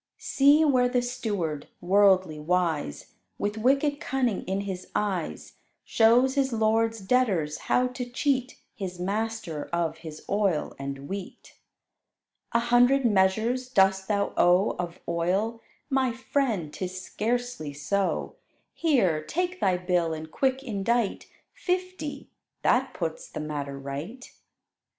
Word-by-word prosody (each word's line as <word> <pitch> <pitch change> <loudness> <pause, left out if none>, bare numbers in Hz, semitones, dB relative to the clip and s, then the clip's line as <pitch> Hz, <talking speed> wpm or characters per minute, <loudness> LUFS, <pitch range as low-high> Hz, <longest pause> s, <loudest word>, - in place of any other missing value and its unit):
See 285 +3 +4
where 255 -4 +3
the 245 -1 +1
steward, 205 - -3
worldly 185 -3 +3
wise, 160 - -1 0.2
With 205 +1 -2
wicked 275 +4 +2
cunning 250 -7 0
in 190 +2 -1
his 190 -2 -5
eyes, 190 -6 -2 0.3
Shows 240 +4 +4
his 270 -1 +1
lord's 225 0 +1
debtors 190 -9 +1
how 250 - +4
to 250 -1 -6
cheat 255 0 -1
His 185 -6 -6
master 205 -4 -2
of 165 -2 -1
his 160 -2 -10
oil 195 -6 0
and 140 0 -6
wheat. 195 +1 -7 1.0
"A 235 - +3
hundred 245 +3 +4
measures 220 +5 +2
dost 190 -4 +3
thou 200 -1 0
owe 180 +3 +4
Of 175 -1 -4
oil? 190 +7 0 0.3
My 265 -3 +1
friend, 230 - -1
'tis 185 0 -5
scarcely 235 -5 -2
so: 185 +8 -1 0.4
Here, 195 - +2
take 360 - -2
thy 185 -2 +2
bill 180 -3 0
and 155 0 -8
quick 265 0 0
indite 230 -1 -1 0.3
Fifty: 365 -4 -3 0.3
that - - +2
puts - - -4
the - - -6
matter 145 -2 -4
right." 145 - -6
205 Hz, 125 wpm, -27 LUFS, 175-250 Hz, 1.0 s, See